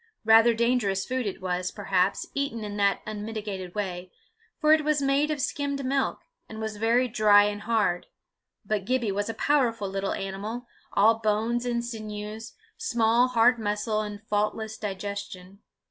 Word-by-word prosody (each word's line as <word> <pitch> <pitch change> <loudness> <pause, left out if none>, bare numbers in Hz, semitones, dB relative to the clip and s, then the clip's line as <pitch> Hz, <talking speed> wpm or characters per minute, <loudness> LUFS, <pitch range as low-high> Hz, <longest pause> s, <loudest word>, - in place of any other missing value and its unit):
Rather 225 +1 +6
dangerous 225 -5 +1
food 255 -1 -2
it 190 - -6
was, 180 0 -1
perhaps, 195 -2 0
eaten 280 -5 -2
in 205 -1 -5
that 200 -1 +1
unmitigated 210 -3 -5
way, 185 -3 -4 0.5
for 305 0 +5
it 315 -1 +3
was 305 0 +2
made 280 +2 +2
of 305 -1 -2
skimmed 280 0 -2
milk, 270 +1 0 0.3
and 220 - -8
was 220 -1 -4
very 235 +4 +2
dry 215 -3 +5
and 205 0 -2
hard; 210 -6 0 0.6
but 215 -2 -1
Gibbie 240 -3 0
was 205 +2 -2
a 225 - -3
powerful 235 -7 +1
little 195 0 -2
animal, 205 +5 -5 0.3
all 220 +3 +4
bones 225 +3 0
and 235 -1 -1
sinews, 215 -1 -6 0.2
small 240 - +2
hard 245 0 +4
muscle, 215 0 -1
and 210 0 -6
faultless 215 +1 -1
digestion. 200 -2 -6
215 Hz, 155 wpm, -27 LUFS, 205-240 Hz, 0.6 s, Rather